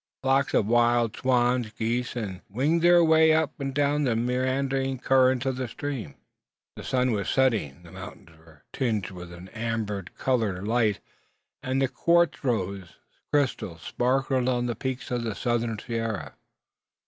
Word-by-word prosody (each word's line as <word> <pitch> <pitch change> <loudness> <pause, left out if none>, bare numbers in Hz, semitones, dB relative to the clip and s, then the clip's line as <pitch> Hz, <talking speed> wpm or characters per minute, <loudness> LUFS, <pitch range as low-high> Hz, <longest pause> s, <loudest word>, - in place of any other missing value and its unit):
Flocks 135 +1 +2
of - - +3
wild 120 0 +3
swans, 125 -2 +1
geese, 120 +3 -2
and 105 -6 -4
gruyas - - -44
winged 145 +11 +1
their 175 0 +6
way 160 0 +5
up 160 -2 +1
and 135 -1 -2
down 145 +1 +1
the 125 -4 +1
meandering 130 +2 0
current 130 0 +3
of 130 -1 -1
the 130 -1 -2
stream. 130 - -5 0.6
The - - -9
sun 125 -1 +1
was 100 -3 -1
setting. 115 - +1
The - - -14
mountains 85 - -11
were 80 -2 -20
tinged 110 -8 -1
with 90 -1 -9
an 90 +2 -11
amber 110 -3 -3
coloured 105 -7 0
light; 110 -3 +1 0.6
and 130 +1 -1
the 135 - +2
quartzose 115 - 0 0.4
crystals 120 - -1
sparkled 130 0 0
on 125 -1 0
the 120 - -1
peaks 130 -1 -4
of 120 -1 0
the 110 -3 -3
southern 120 -1 -1
sierra. 115 -2 -4
125 Hz, 155 wpm, -26 LUFS, 110-135 Hz, 0.6 s, their